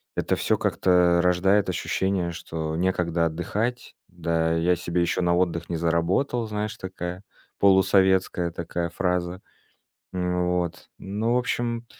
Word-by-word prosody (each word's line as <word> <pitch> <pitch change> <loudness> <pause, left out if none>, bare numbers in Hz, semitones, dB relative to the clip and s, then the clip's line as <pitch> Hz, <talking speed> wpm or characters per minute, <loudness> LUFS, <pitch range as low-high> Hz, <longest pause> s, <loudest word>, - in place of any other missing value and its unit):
это - - 0
всё - - +1
как-то 90 -1 +3
рождает 95 +3 +3
ощущение, 90 0 -1
что 80 -1 -5
некогда 85 -1 0
отдыхать, 105 +9 -3
да, 85 -2 -1
я 85 +2 +2
себе 85 0 -1
ещё 85 +1 0
на 85 0 +3
отдых 85 -2 0
не 85 - -2
заработал. 85 - 0
Знаешь, 105 0 -3
такая 90 0 -6 0.4
полусоветская 95 -2 +3
такая 85 +1 -3
фраза. 90 +1 -2 0.7
Н, 90 -1 -1
вот. 90 0 -2
Ну, 105 +4 -2
в - - +4
общем, 120 -1 -2
90 Hz, 130 wpm, -25 LUFS, 85-95 Hz, 0.7 s, в